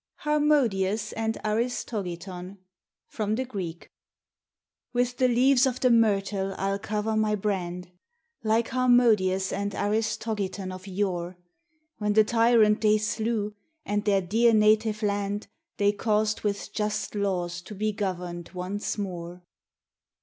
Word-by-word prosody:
HARMODIUS 235 -9 +1
AND 225 0 -2
ARISTOGITON 200 -5 -3 0.5
From 215 -1 -2
the 260 +3 -2
Greek 185 -9 -6 1.1
With 245 0 0
the 255 - +4
leaves 255 +2 +4
of 255 -1 -2
the 255 - +3
myrtle 200 -4 +2
I'll 195 +1 -1
cover 215 +2 -2
my 215 -1 +2
brand, 180 -3 -3 0.5
Like 225 +1 +1
Harmodius 230 -7 +3
and 200 0 -2
Aristogiton 205 -2 -2
of 185 +1 -10
yore; 185 -2 -2 0.6
When 210 -1 +1
the 215 +1 +6
tyrant 225 -1 +4
they 215 -1 +4
slew, 215 0 -1 0.3
and 205 0 -1
their 200 -2 +2
dear 225 +6 +3
native 215 0 +3
land 205 0 -1 0.3
They 205 -2 +3
caused 215 +1 0
with 205 -1 -3
just 210 0 -2
laws 180 -4 -2
to 205 +4 -10
be 215 +2 0
governed 180 -4 -4
once 190 +5 -3
more. 180 -3 -6
210 Hz, 125 wpm, -27 LUFS, 190-225 Hz, 1.1 s, the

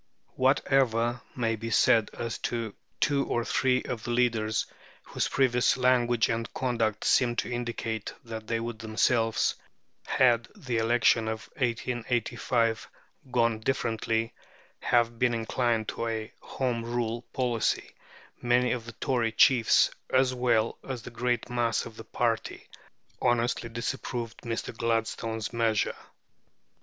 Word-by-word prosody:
Whatever 130 -3 +2
may 115 -2 0
be 115 +1 -5
said 110 -1 +4
as 115 -1 -4
to 115 -3 -3 0.3
two 140 -1 +2
or 120 0 0
three 130 -1 +2
of 115 -2 -5
the - - -5
leaders, 115 -3 +1 0.4
whose - - -2
previous 125 -2 +2
language 120 -2 +3
and 115 0 -2
conduct 115 -5 0
seemed 120 -2 +3
to - - -1
indicate 115 -2 -3
that 110 -1 -7
they 115 0 0
would 115 -1 -5
themselves, 115 0 +1 0.5
had 120 -2 +3
the 130 - -3
election 115 0 +3
of 110 0 -4
1885 120 -2 -1 0.4
gone 115 -3 +2
differently, 115 -1 -1 0.5
have 120 -1 +1
been 125 -1 +2
inclined 115 -1 0
to 115 - -3
a 110 -1 -4
Home 125 -3 -2
Rule 120 -1 -2
policy, 120 -3 0 0.5
many 125 +1 +3
of 120 -2 -3
the 115 - -8
Tory 120 -4 0
chiefs, 115 +1 +5 0.2
as 130 0 +3
well 120 -3 +1
as 130 -4 -5
the - - -8
great 120 0 -1
mass 120 -2 0
of 115 - -10
the 115 - -9
party, 115 0 -2 0.5
honestly 120 -1 +1
disapproved 115 0 -4
Mr. 115 0 -4
Gladstone's 115 -1 -2
measure. 115 -2 +1
115 Hz, 130 wpm, -28 LUFS, 115-125 Hz, 0.5 s, chiefs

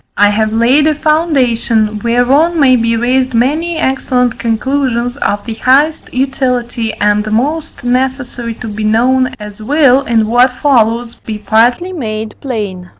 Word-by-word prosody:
I 205 +1 +4
have 215 +1 0
laid 245 +7 +3
a 310 - +1
foundation, 250 -9 0
whereon 270 +8 +2
may 260 -3 +5
be 230 -1 0
raised 255 +1 0
many 310 +8 0
excellent 250 -4 -1
conclusions 245 +1 -1
of 205 -7 -2
the 230 - -4
highest 280 +7 +1
utility 250 -3 -2
and 210 +1 0
most 295 +8 -2
necessary 250 -2 -2
to 230 - -8
be 215 0 -5
known, 255 +4 +1
as 210 0 -10
will, 275 +2 +3
in 230 -4 +1
what 245 +3 +3
follows, 235 -4 +1
be 215 -1 -7
partly 240 - +1
made 220 -8 -5
plain. 205 -9 -5
245 Hz, 145 wpm, -13 LUFS, 220-270 Hz, -, may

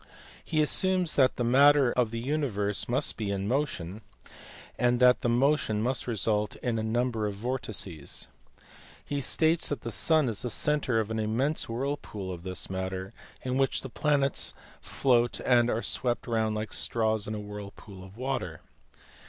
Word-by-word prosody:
He 155 -2 +1
assumes 185 +2 +2
that 130 -2 +3
the 120 - -1
matter 135 +2 +5
of 125 -3 +1
the 115 - -5
universe 115 -7 -1
must 120 - 0
be 110 -3 -3
in 100 0 -2
motion, 110 - -2 0.7
and 120 -1 +2
that 125 0 +5
the 120 - 0
motion 125 -3 +2
must 130 +2 0
result 105 -1 0
in 115 -3 -2
a - - -2
number 115 -1 0
of 100 - -4
vortices. 100 - -3 0.8
He 145 -1 -2
states 160 +5 +2
that 145 - -3
the 115 - -5
sun 155 +3 +3
is 110 -4 -1
the 125 - -1
centre 140 -1 +1
of 110 0 -2
an 110 - -1
immense 120 +9 0
whirlpool 115 -6 -4
of 85 - -8
this 95 +1 -5
matter, 95 +2 -4 0.3
in 130 +1 -1
which 135 - +1
the 135 - -7
planets 140 0 +1 0.3
float 120 -3 +1
and 120 -1 +4
are 115 +1 -1
swept 120 -2 0
round 110 -2 0
like 105 +1 -4
straws 110 -2 +1
in 110 - -3
a - - -4
whirlpool 105 -2 -9
of 95 +2 -14
water. 125 - -3
120 Hz, 170 wpm, -28 LUFS, 105-135 Hz, 0.8 s, matter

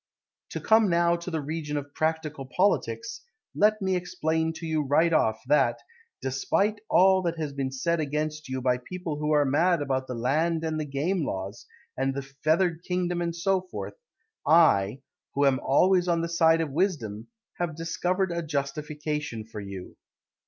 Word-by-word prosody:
To - - -4
come 220 -2 +4
now 170 0 +3
to 170 +1 -7
the 160 -3 -2
region 150 0 -3
Of 145 0 -6
practical 155 -3 -2
politics, 415 - 0 0.3
Let 215 0 +3
me 190 -1 +1
explain 160 -2 -1
to 165 +1 -8
you 160 -1 0
right 155 +4 +2
off 110 -7 +2
That, 150 +3 +3 0.5
despite 195 +11 0
all 190 +1 +5
that 170 -2 -2
has 150 -3 -3
been 135 -1 -2
said 170 +6 0
against 150 0 -3
you 130 0 -3
By 125 -1 +2
people 170 +2 -5
who 150 0 -1
are 150 -1 +4
mad 165 +6 +3
about 130 -2 -1
the 125 - -4
Land 155 +7 0
And 160 -1 -1
the 155 - -2
Game 150 +6 -1
laws, 95 -2 -5 0.3
And 135 +1 -1
the 140 - -3
feathered 160 +5 0
kingdom 180 -1 -1
And 170 -1 -2
so 190 +2 +1
forth, 105 - -7 0.5
I, 100 +7 +4 0.3
Who 140 +1 +3
am 135 -2 +3
always 180 +5 +3
on 170 -1 +2
the 170 - -2
side 165 -1 +4
of 155 -3 -2
wisdom, 135 - -1 0.3
Have 175 -3 -2
discovered 175 +3 -1
a 170 0 -1
justification 150 -4 -3
for 110 -1 -8
you. 100 -2 -8
155 Hz, 175 wpm, -27 LUFS, 135-175 Hz, 0.5 s, all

